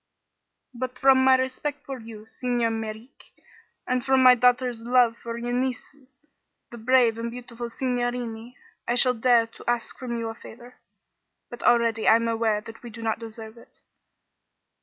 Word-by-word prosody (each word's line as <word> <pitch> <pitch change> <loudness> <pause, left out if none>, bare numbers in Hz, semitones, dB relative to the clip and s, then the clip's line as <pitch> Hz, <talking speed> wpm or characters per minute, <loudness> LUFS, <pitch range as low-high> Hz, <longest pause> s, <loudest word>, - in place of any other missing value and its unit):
"But 255 +1 -5
from 265 0 +5
my 260 0 +6
respect 275 +3 -4
for 270 -2 -6
you, 220 -2 -11
Signer 240 0 -1
Merreek, 225 +2 -8 0.5
and 255 -1 -1
from 265 -1 +3
my 255 0 +9
daughter's 250 -1 +1
love 240 -1 +3
for 235 0 -5
your 240 +1 -4
nieces 260 +2 -4 0.6
the 235 - -9
brave 235 -1 +3
and 230 0 -3
beautiful 240 0 -8
signorini 245 -1 -3 0.3
I 240 - +1
shall 250 0 +4
dare 235 0 +3
to 230 - -8
ask 240 -1 -2
from 240 -2 -4
you 230 -1 -3
a - - -5
favor. 240 +2 -14 0.7
But 240 - -9
already 230 -2 +2
I 220 - +7
am 230 0 +1
aware 225 -2 0
that 225 +1 -12
we 240 - -9
do 230 0 -10
not 225 0 -1
deserve 225 0 -10
it." - - -21
240 Hz, 165 wpm, -25 LUFS, 230-255 Hz, 0.7 s, my